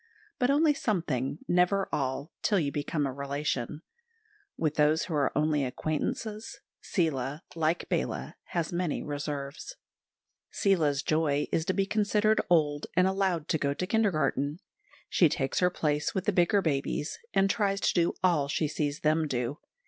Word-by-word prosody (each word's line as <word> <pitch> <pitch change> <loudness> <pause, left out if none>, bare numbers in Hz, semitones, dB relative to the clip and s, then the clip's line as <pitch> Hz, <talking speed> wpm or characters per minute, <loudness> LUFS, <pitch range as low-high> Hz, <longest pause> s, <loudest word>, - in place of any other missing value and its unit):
But 250 -1 +2
only 295 +2 +4
something, 165 - -1
never 180 +2 +2
all, 140 +2 -2
till 205 - +2
you 145 -4 -1
become 145 +1 -1
a 135 - -2
relation; 140 +1 -3 0.7
with 155 -2 0
those 155 +1 +3
who 170 - -5
are 145 -2 +2
only 150 -1 +2
acquaintances 155 - -3 0.2
Seela, 145 -4 -1
like 165 +1 0
Bala, - - -2
has 170 -1 -2
many 175 -3 -1
reserves. 145 - -5 0.7
Seela's 155 -8 +1
joy 150 -2 +1
is 160 - 0
to 185 - 0
be 195 0 +1
considered 215 +1 +2
old 150 -4 +2
and 180 +1 +5
allowed 190 -4 0
to 160 - +1
go 140 0 0
to - - -3
the - - -14
kindergarten. 155 - +1 0.5
She 170 - +4
takes 135 -1 -1
her 180 - +4
place 150 -4 -1
with 190 - -1
the 210 - +2
bigger 185 +3 +3
babies, 145 0 -1 0.2
and 195 - +4
tries 195 0 +1
to - - +2
do 170 -1 +2
all 165 -6 +3
she 150 +2 0
sees 145 0 -2
them 155 +1 +2
do. 125 +3 -2
155 Hz, 160 wpm, -29 LUFS, 145-185 Hz, 0.7 s, and